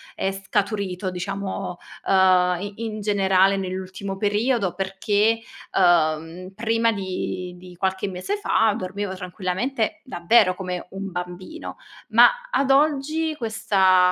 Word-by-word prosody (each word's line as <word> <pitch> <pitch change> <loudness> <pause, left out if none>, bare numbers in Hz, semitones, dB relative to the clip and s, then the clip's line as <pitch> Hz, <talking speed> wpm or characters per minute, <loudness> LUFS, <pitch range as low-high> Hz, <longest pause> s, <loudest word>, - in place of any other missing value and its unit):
è 195 - -1
scaturito 195 -1 -2
diciamo, 190 0 -4 0.3
uhm, 185 -2 +4
i 205 0 -5
in 215 -1 -4
generale 195 -1 +3
nell'ultimo 190 +1 -4
periodo 210 -1 +1
perché, 205 +4 +1 0.4
uhm, 170 0 +2
prima 230 +2 +1
di 185 -2 -4
di 180 0 -13
qualche 190 +1 -1
mese 185 - -3
fa 225 - +2
dormivo 190 0 -4
tranquillamente, 205 - -2
davvero 200 -4 +3
come 180 -2 -5
un 195 +1 -5
bambino. 180 - -7 0.3
Ma - - +8 0.2
ad 275 - +1
oggi 305 +3 +2
questa 195 -6 +3
195 Hz, 115 wpm, -23 LUFS, 185-220 Hz, 0.4 s, Ma